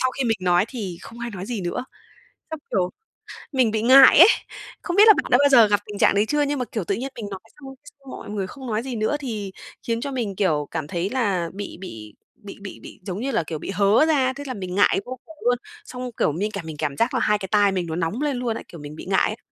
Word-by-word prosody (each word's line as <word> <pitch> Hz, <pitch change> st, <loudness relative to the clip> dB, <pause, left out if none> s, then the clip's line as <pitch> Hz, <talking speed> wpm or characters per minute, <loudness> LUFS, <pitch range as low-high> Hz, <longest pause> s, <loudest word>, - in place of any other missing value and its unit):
sau 255 Hz, -, +2 dB
khi 265 Hz, 0 st, -3 dB
mình 225 Hz, -2 st, +1 dB
nói 180 Hz, +1 st, +3 dB
thì 195 Hz, -9 st, -6 dB
không 230 Hz, -, -11 dB
ai 235 Hz, 0 st, -4 dB
nói 190 Hz, -1 st, -7 dB
gì 235 Hz, -5 st, -3 dB
nữa, 175 Hz, +8 st, -3 dB, 0.7 s
xong, 320 Hz, -1 st, -5 dB
kiểu, 185 Hz, -2 st, +1 dB, 0.6 s
mình 255 Hz, -5 st, +2 dB
bị 220 Hz, -1 st, -1 dB
ngại 260 Hz, +3 st, +8 dB
ấy, 360 Hz, -, +11 dB, 0.5 s
không 350 Hz, -, -3 dB
biết 420 Hz, +2 st, +7 dB
là 430 Hz, -, +10 dB
bạn -, -, -16 dB
đã 245 Hz, -, +7 dB
bao 285 Hz, -, +5 dB
giờ 235 Hz, -5 st, +7 dB
gặp 205 Hz, 0 st, +2 dB
tình 205 Hz, -1 st, -8 dB
trạng -, -, +4 dB
đấy 205 Hz, -, +3 dB
chưa, 295 Hz, +5 st, 0 dB
nhưng 290 Hz, -1 st, 0 dB
mà, 250 Hz, -, -1 dB
kiểu, 215 Hz, -2 st, -4 dB
tự 195 Hz, -, -1 dB
nhiên 260 Hz, +5 st, -4 dB
mình 210 Hz, -3 st, -6 dB
nói 195 Hz, -, -6 dB, 0.2 s
xong 270 Hz, -1 st, -10 dB, 0.3 s
xong 275 Hz, -1 st, -15 dB
mọi -, -, -9 dB
người 200 Hz, -3 st, -3 dB
không 260 Hz, +5 st, -10 dB
nói 220 Hz, 0 st, -1 dB
gì 260 Hz, -3 st, -5 dB
nữa 220 Hz, +7 st, 0 dB
thì 215 Hz, -8 st, -5 dB, 0.4 s
khiến 230 Hz, 0 st, -1 dB
cho 280 Hz, -, -4 dB
mình, 230 Hz, -7 st, -3 dB
kiểu, 155 Hz, -7 st, 0 dB
cảm 160 Hz, -3 st, -3 dB
thấy 175 Hz, +4 st, -2 dB
là 200 Hz, -10 st, 0 dB
bị 205 Hz, +1 st, -7 dB
bị 110 Hz, -, -9 dB, 0.3 s
bị 200 Hz, -, -9 dB
bị 200 Hz, -, -9 dB
bị, -, -, -12 dB
giống 190 Hz, 0 st, -4 dB
như 270 Hz, +4 st, -2 dB
là, 190 Hz, -, 0 dB
kiểu, 155 Hz, -1 st, -5 dB
bị -, -, -7 dB
hớ 200 Hz, +8 st, +4 dB
ra, 270 Hz, -5 st, +2 dB
thế 280 Hz, +2 st, -8 dB
là 260 Hz, -, -3 dB
mình 185 Hz, -5 st, -6 dB
ngại 200 Hz, -1 st, +4 dB
vô 255 Hz, 0 st, -7 dB
cùng 320 Hz, -, -14 dB
luôn, 245 Hz, 0 st, +3 dB, 0.3 s
xong, 250 Hz, 0 st, -6 dB
kiểu, -, -, +2 dB
mình 205 Hz, +7 st, -2 dB
cảm 195 Hz, -5 st, -6 dB
mình 155 Hz, -2 st, -7 dB
cảm 145 Hz, -2 st, -3 dB
giác 235 Hz, +3 st, +1 dB
là 255 Hz, -, +1 dB
hai 210 Hz, -2 st, +2 dB
cái 190 Hz, -, -6 dB
tai 205 Hz, -2 st, +4 dB
mình 180 Hz, -2 st, -2 dB
nó 160 Hz, -, -4 dB
nóng 175 Hz, -, -2 dB
lên 285 Hz, -4 st, 0 dB
luôn 240 Hz, -2 st, -2 dB
ấy, -, -, -8 dB
kiểu, 170 Hz, -, -11 dB
mình 145 Hz, +1 st, -9 dB
bị -, -, -9 dB
ngại 190 Hz, 0 st, +2 dB
ấy. 215 Hz, -, -5 dB
215 Hz, 285 wpm, -23 LUFS, 185-255 Hz, 0.7 s, ấy